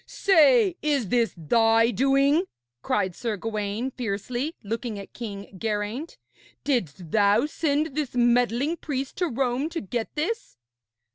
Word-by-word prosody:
'Say, 395 +1 +4
is 285 -9 0
this 235 0 +2
thy 225 +7 +3
doing?' 275 +6 +3 0.4
cried 190 +3 0
Sir 225 -4 -3
Gawaine 215 +4 -3
fiercely, 245 - -3
looking 225 +1 -4
at 200 - -10
King 200 -4 -7
Geraint. 220 - -3 0.5
'Didst 185 - -2
thou 210 +4 +4
send 300 -1 -1
this 295 -5 -2
meddling 245 +5 +2
priest 275 -4 -4
to 360 - +1
Rome 265 +2 -1
to 330 - -4
get 225 +3 -3
this?' 330 - -3
245 Hz, 130 wpm, -25 LUFS, 210-290 Hz, 0.5 s, Say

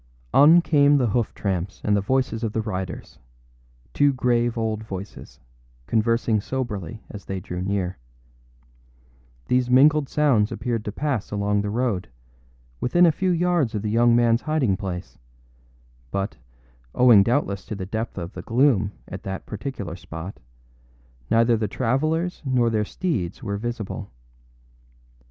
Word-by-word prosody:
On 160 +5 +7
came 145 -2 +4
the 125 -4 +1
hoof 115 +1 0
tramps 95 -2 -3
and 105 - +2
the 100 - +2
voices 125 +1 0
of 110 -2 -2
the 110 - 0
riders, 95 -4 -5 0.7
two 145 0 +4
grave 120 -2 +1
old 110 -1 -2
voices, 100 -2 -9 0.5
conversing 115 - +1
soberly 115 -4 -4
as 100 -3 -9
they 95 -1 -4
drew 90 0 -6
near. 95 -4 -2 1.5
These 125 0 +1
mingled 140 +3 +5
sounds 130 -9 +2
appeared 115 -3 -2
to 105 - -3
pass 130 -1 -2
along 100 0 0
the 105 - -3
road, 110 -4 -1 0.7
within 175 +8 +4
a 165 - +5
few 185 +4 -1
yards 170 -8 +1
of 105 - -2
the 105 - -1
young 120 +1 +4
manâs 120 0 +3
hiding 150 -10 +1
place; 95 -2 -6 0.9
but, 100 +5 -3 0.6
owing 120 -5 +7
doubtless 100 -3 0
to 105 - -5
the 95 -2 -5
depth 110 +4 -4
of 85 +4 -5
the - - -7
gloom 115 -5 +2
at - - -7
that 95 0 -6
particular 105 - -5
spot, 90 +1 -8 0.9
neither 115 +1 +4
the 110 -1 -1
travellers 155 - -1
nor 125 -4 +2
their 105 -1 +1
steeds 100 - -3
were 100 0 -2
visible. 110 -3 -5
115 Hz, 145 wpm, -24 LUFS, 100-130 Hz, 1.5 s, On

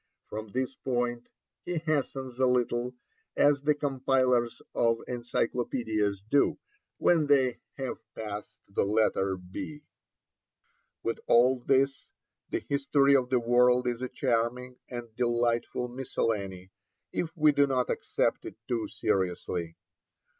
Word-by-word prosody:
From 110 +1 -6
this 130 +5 -2
point 120 -2 -2 0.3
he 175 -1 -3
hastens 135 -5 -2
a 130 - +4
little, 125 0 0 0.4
as 145 -1 +4
the 150 +1 +2
compilers 130 -4 +1
of 115 -1 +2
encyclopædias 115 -4 -1
do 140 +4 +3 0.4
when 160 -4 +3
they 130 -4 +3 0.2
have 135 -2 -4 0.2
passed 105 0 -6
the 100 - 0
letter 100 -2 +1
B. 145 +12 -8 1.2
With 115 - -2
all 125 +2 +5
this, 135 +2 +1 0.4
the - - -1
History 140 0 +3
of 125 -2 +2
the 130 -1 +3
World 125 +1 +4
is 120 -1 -1
a 130 - -3
charming 125 0 -1
and 120 -3 -7
delightful 120 0 0
miscellany, 100 -7 -3 0.4
if 165 0 -3
we 155 -1 +6
do 140 0 +3
not 130 -2 +1
accept - - 0
it - - -7
too 120 -3 -1
seriously. 90 -4 -1
125 Hz, 125 wpm, -29 LUFS, 115-135 Hz, 1.2 s, we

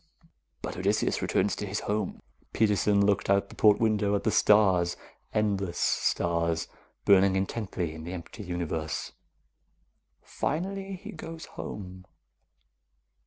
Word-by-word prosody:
"But - - -4
Odysseus - - +1
returns - - +1
to - - -4
his - - -2
home." 105 -1 -2 0.3
Peterson 105 -1 +3
looked 100 -1 +1
out 100 0 +3
the - - -12
port 105 -1 +5
window, 105 -2 +2
at 100 - -1
the 110 - +2
stars, 95 -6 +4 0.3
endless 100 -4 0
stars, 85 -1 +1 0.4
burning 95 -1 +5
intently 95 -4 -2
in 80 0 -8
the 85 +3 -6
empty 90 +4 -8
universe. 85 -4 -3 1.1
"Finally 195 +5 -3
he 210 +4 -9
goes 165 -5 -8
home." 95 -2 -7
100 Hz, 120 wpm, -28 LUFS, 90-105 Hz, 1.1 s, port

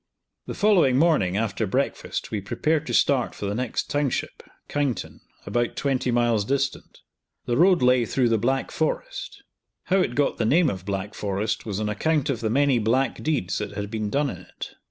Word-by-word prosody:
The - - -5
following 180 -12 +4
morning, 135 - +3
after 110 0 -1
breakfast, 135 +9 -2
we 105 -2 -2
prepared 155 +10 -1
to - - -3
start 135 -4 +2
for - - -5
the 100 - -1
next 125 +2 -2
township, 145 -2 -2 0.3
Kyneton, 140 -8 -2 0.2
about 120 +3 -1
20 135 -2 0
miles 120 -3 +2
distant. 140 +4 -2 0.4
The 120 - 0
road 175 +2 +4
lay 125 -1 +4
through 125 -3 +1
the 115 -1 +2
Black 130 +4 0
Forest. - - -3 0.4
How 190 - +1
it 150 -11 +1
got 145 -1 +1
the - - +2
name 160 +3 +4
of 95 -1 -7
Black 100 +1 -3
Forest 105 +2 -2
was 100 -1 -2
on 110 - -1
account 145 +7 0
of 120 - -3
the 110 - -1
many 135 +1 +3
black 120 +5 +1
deeds 140 - -1
that - - -5
had 100 0 -5
been 110 -2 -2
done 140 +4 0
in - - -7
it. - - -9
125 Hz, 190 wpm, -24 LUFS, 105-145 Hz, 0.4 s, following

